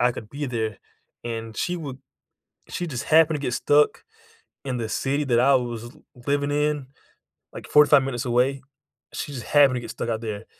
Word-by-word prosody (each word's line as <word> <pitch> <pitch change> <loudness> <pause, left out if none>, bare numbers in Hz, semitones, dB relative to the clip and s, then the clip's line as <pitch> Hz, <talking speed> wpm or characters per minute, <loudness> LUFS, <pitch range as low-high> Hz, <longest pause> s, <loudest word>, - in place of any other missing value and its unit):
I 125 - +4
could 110 - -9
be 145 +4 -5
there, 110 -5 -3 0.5
and 115 -2 -5
she 180 - -1
would 140 -6 -7 0.7
She 175 - -4
just 140 -4 -4
happened 160 0 +4
to - - -9
get 120 - -1
stuck 145 +3 +2 0.6
in 130 -2 -2
the 115 -2 -3
city 140 +5 -1
that 120 -4 +2
I 135 +2 +5
was 120 -3 -1
l 140 +6 -13 0.2
living 145 0 +1
in, 150 -2 0 0.7
like, - - -9
45 150 -2 +6
minutes 125 -3 -3
away. 125 +3 +1 0.5
She 145 - -5
just 125 -4 -6
happened 140 -3 +5
to 125 - -2
get - - -8
stuck - - -5
out 110 -1 -2
there, 110 -1 -5
130 Hz, 195 wpm, -24 LUFS, 120-145 Hz, 0.7 s, 45